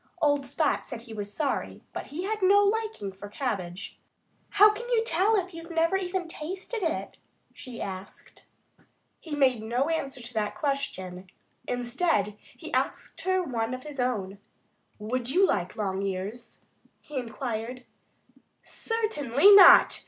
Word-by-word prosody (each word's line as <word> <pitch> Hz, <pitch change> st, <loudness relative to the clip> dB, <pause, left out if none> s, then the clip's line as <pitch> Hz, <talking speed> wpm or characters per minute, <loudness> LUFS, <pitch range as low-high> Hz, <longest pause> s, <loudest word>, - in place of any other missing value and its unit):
Old 290 Hz, -4 st, +2 dB
Spot 300 Hz, +3 st, 0 dB
said 235 Hz, -3 st, -7 dB
he 230 Hz, -2 st, -11 dB
was 205 Hz, -1 st, -5 dB
sorry; 285 Hz, +4 st, -2 dB
but -, -, -5 dB
he 325 Hz, +5 st, -5 dB
had 430 Hz, +2 st, -2 dB
no 400 Hz, +2 st, +6 dB
liking 430 Hz, -, -1 dB
for 200 Hz, +2 st, -10 dB
cabbage. 195 Hz, -7 st, -4 dB, 0.5 s
"How 415 Hz, +1 st, +7 dB
can 475 Hz, +3 st, -7 dB
you 465 Hz, -2 st, +3 dB
tell 400 Hz, +2 st, +2 dB
if 375 Hz, -2 st, -1 dB
you've 330 Hz, +1 st, -9 dB
never 330 Hz, +2 st, +2 dB
tasted 370 Hz, +3 st, -4 dB
it?" 330 Hz, -3 st, -2 dB, 0.4 s
she 255 Hz, -4 st, -9 dB
asked. 190 Hz, 0 st, -8 dB, 0.7 s
He 315 Hz, -3 st, -6 dB
made 260 Hz, -5 st, +3 dB
no 245 Hz, +7 st, 0 dB
answer 275 Hz, -5 st, -2 dB
to 245 Hz, 0 st, -8 dB
that 215 Hz, -2 st, -1 dB
question. 190 Hz, -, -3 dB, 0.4 s
Instead, 245 Hz, -, 0 dB, 0.2 s
he -, -, -9 dB
asked 330 Hz, -, -2 dB
her 375 Hz, +1 st, +1 dB
one 235 Hz, -5 st, -2 dB
of 255 Hz, -, -10 dB
his 295 Hz, -2 st, -9 dB
own. 205 Hz, -6 st, -2 dB, 0.6 s
"Would 240 Hz, +3 st, -3 dB
you 365 Hz, +8 st, +4 dB
like 180 Hz, -, -1 dB
long 195 Hz, -2 st, -2 dB
ears?" 200 Hz, +4 st, -5 dB, 0.3 s
he 295 Hz, -, -8 dB
inquired. 245 Hz, 0 st, -5 dB, 0.8 s
"Certainly 405 Hz, -, +3 dB
not!" 395 Hz, -2 st, +9 dB
275 Hz, 145 wpm, -27 LUFS, 220-360 Hz, 0.8 s, not